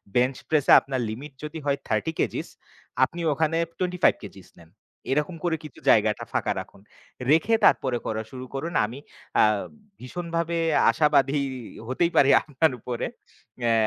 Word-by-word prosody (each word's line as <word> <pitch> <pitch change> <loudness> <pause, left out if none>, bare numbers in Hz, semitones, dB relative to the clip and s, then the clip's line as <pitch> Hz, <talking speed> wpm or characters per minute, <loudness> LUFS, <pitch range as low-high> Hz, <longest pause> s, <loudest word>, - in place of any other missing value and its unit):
Bench 125 +2 +3
press 155 -3 +2
এ - - +10
আপনার 135 -1 -3
limit 135 +7 -7
যদি 150 +1 -6
হয় 140 -1 +1
30 110 +9 0
কেজিস - - -1 0.6
আপনি 170 +6 -1
ওখানে 160 +2 0 0.2
25 180 -1 +2
কেজিস 95 -2 -11
নেন। 85 -1 -17 0.4
এরকম 150 +5 0
করে 170 -2 +1
কিছু 150 -4 -11
জায়গাটা 105 -1 +3
ফাঁকা - - 0
রাখুন। - - -11 0.5
রেখে 165 +9 +3
তারপরে 130 -2 +3
করা 110 0 -2
শুরু 130 -1 -7
করুন। 165 +5 -4
আমি 120 +6 -8 0.4
আ - - +7 0.6
ভীষণভাবে 170 +4 -3 0.3
আশাবাদী 145 +1 +3 0.5
হতেই 170 +7 +1
পারি 140 - +6
আপনার 155 +1 +1
উপরে। 120 +1 -4 0.6
অ্যা 115 -1 +2
140 Hz, 145 wpm, -25 LUFS, 125-165 Hz, 0.6 s, এ